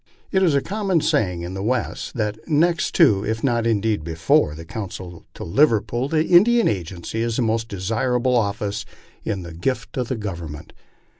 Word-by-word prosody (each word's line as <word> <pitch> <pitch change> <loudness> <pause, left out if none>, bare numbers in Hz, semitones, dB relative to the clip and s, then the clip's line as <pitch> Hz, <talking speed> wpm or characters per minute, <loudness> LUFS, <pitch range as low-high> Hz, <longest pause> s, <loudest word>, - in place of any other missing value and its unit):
It 190 - +2
is 170 -6 +3
a 140 - +2
common 195 -4 0
saying 90 -10 0
in 90 +2 -5
the 95 - -4
West 120 +4 -2
that 105 -2 -2
next 170 +3 +2
to, 110 - +5
if 110 +1 -2
not 120 -4 +1
indeed 110 -5 +1
before, 80 -2 +1
the 80 +1 -9
consulship 90 -3 -7
to - - -7
Liverpool, 120 - +2
an 155 +1 +3
Indian 220 +7 +5
agency 95 +2 -3
is 115 -1 -1
the 125 - +1
most 115 0 0
desirable 120 +6 0
office 105 -2 -1 0.4
in 100 -4 -3
the 85 -1 -8
gift 120 +10 -3
of 125 -2 -1
the 130 - -2
Government. 85 -7 -7
110 Hz, 175 wpm, -22 LUFS, 95-130 Hz, 0.4 s, to